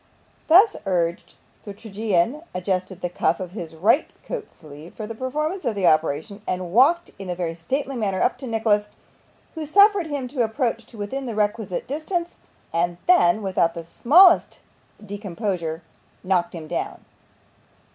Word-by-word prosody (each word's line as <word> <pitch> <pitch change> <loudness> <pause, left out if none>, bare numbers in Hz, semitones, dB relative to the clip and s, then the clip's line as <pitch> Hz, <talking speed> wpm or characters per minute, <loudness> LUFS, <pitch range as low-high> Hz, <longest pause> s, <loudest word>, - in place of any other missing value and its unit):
Thus 390 +7 +6
urged, 170 -2 -1 0.3
the 205 -2 -8
tragedian 215 - -1
adjusted 185 0 -2
the - - -1
cuff 170 -1 0
of 185 -2 -6
his 170 -5 -7
right 215 - +2
coat 460 -4 -5
sleeve 150 +1 -13
for 215 - -5
the 230 - -6
performance 305 - -3
of 230 - -1
the 195 -2 0
operation, 155 +6 +1
and 180 -1 -3
walked 330 +9 +4
in 195 -2 -7
a 180 - -2
very 170 -2 -3
stately 265 - -3
manner 200 -5 -1
up 250 0 +1
to 265 - -7
Nicholas, 220 -2 +1 0.7
who 320 - -5
suffered 400 +3 +5
him 285 -4 -3
to 250 -2 0
approach 230 0 -2
to 230 - -13
within 255 +6 -4
the 230 - -4
requisite 210 -2 -1
distance, 340 +5 -3 0.4
and 170 +1 0
then, 220 - +4
without 185 -3 +1
the 170 - -6
smallest 330 - +5 0.4
discomposure, 190 -5 -4 0.4
knocked 180 -2 0
him 160 -2 -7
down. - - -4
210 Hz, 155 wpm, -23 LUFS, 175-270 Hz, 0.7 s, Thus